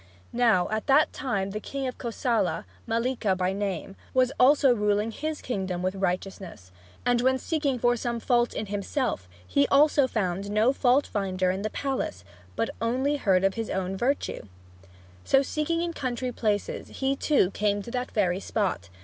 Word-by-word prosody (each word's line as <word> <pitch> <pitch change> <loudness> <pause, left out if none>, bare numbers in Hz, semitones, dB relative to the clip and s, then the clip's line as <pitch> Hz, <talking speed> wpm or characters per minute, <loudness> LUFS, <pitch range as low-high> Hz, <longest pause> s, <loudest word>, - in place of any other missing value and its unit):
Now 225 -7 +3
at 215 0 -2
that 285 +3 +4
time 200 -7 -2
the 210 - -3
king 275 +5 -5
of 255 - -5
Kosala, 225 - -1 0.2
Mallika 230 -4 0
by 185 +1 0
name, 195 -2 -3 0.2
was 255 0 +4
also 275 0 +6
ruling 210 0 +1
his 310 +5 -4
kingdom 190 -6 -3
with 185 0 0
righteousness; 185 - -4 0.3
and 245 -1 +3
when 260 +1 +3
seeking 285 -1 -1
for 240 +1 +2
some 235 0 -2
fault 240 0 +1
in 215 - -2
himself, 205 - -2 0.2
he 115 +11 +2
also 285 -1 +4
found 195 -4 -2
no 215 +5 +3
fault 270 +1 +3
finder 185 -2 -1
in 190 +1 -3
the 215 - -2
palace 260 - -3 0.3
but - - -1
only 260 +5 +1
heard 190 -7 +2
of 195 0 +3
his 225 -1 -4
own 190 0 -2
virtue! 255 +8 -1 0.8
So 270 0 +4
seeking 320 +4 -1
in 340 -1 -2
country 255 -3 -3
places, 210 -4 -2
he 270 0 -1
too 275 - +2
came 205 0 0
to 235 - -8
that 250 +1 -2
very 185 -3 +1
spot. 195 - -2
225 Hz, 170 wpm, -27 LUFS, 195-260 Hz, 0.8 s, also